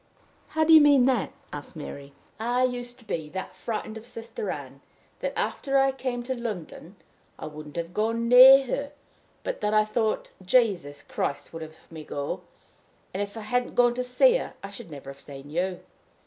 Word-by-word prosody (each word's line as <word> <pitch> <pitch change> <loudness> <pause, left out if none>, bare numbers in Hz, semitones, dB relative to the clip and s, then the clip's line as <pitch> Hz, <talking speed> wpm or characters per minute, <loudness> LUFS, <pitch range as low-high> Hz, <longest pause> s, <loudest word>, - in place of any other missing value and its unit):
"How 315 - +5
do 325 +1 +6
you 315 - +10
mean 285 -4 +6
that?" 255 -6 +1 0.2
asked 145 +2 -8
Mary. 140 -2 -8 0.3
"I 245 +3 +1
used 245 -1 -2
to 240 - -18
be 160 -7 -3
that 190 +3 -6
frightened 220 -1 -4
of 220 - -11
Sister 225 -3 -6
Ann 135 -3 -6 0.4
that, - - -2
after 275 -1 0
I 270 0 +4
came 255 -2 -3
to 260 +2 -2
London, 210 -6 -6 0.4
I - - -7
wouldn't 150 -1 -9
have 170 0 -4
gone 230 +3 0
near 260 +3 +10
her, 280 +3 -3 0.5
but - - -4
that 210 +1 +1
I 215 0 +5
thought 215 0 -1
Jesus 180 - +2
Christ 140 - -3
would 165 - -6
have 160 0 -9
me 160 -1 -8
go; 145 -1 -4 0.7
and, 190 - -2
if 205 +2 -4
I - - -5
hadn't 245 +3 -1
gone 240 -1 +5
to 250 +1 -2
see 480 - +4
her, - - -6
I 195 - -6
should 200 -2 -9
never 140 -2 -8
have 140 - -14
seen 140 0 -10
you. 180 +2 -1
220 Hz, 190 wpm, -26 LUFS, 165-250 Hz, 0.7 s, you